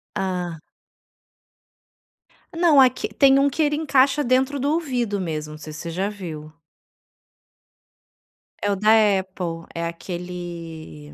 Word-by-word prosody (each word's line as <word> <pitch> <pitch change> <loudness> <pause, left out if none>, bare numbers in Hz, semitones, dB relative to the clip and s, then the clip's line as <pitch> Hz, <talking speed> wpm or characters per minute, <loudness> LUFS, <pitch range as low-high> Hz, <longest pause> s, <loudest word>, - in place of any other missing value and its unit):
Ah. 180 -4 -3 2.0
Não, 330 -4 +5
aqui 255 -1 +3
tem 275 -1 +5
um 280 +1 +3
que 320 - -2
ele 295 0 +1
encaixa 285 -2 +2
dentro 260 +3 +1
do 285 +3 0
ouvido 245 -10 -1
mesmo, 155 -4 -4
não - - -9
sei 155 0 -9
se 155 - -8
você 170 - -6
já 190 +4 -1
viu. 160 -7 -8 2.1
É 205 - +2
o - - +1
da 210 +2 +1 0.3
Apple, 175 -3 -6
é 170 0 -2
aquele 170 - -7
190 Hz, 130 wpm, -23 LUFS, 165-265 Hz, 2.1 s, Não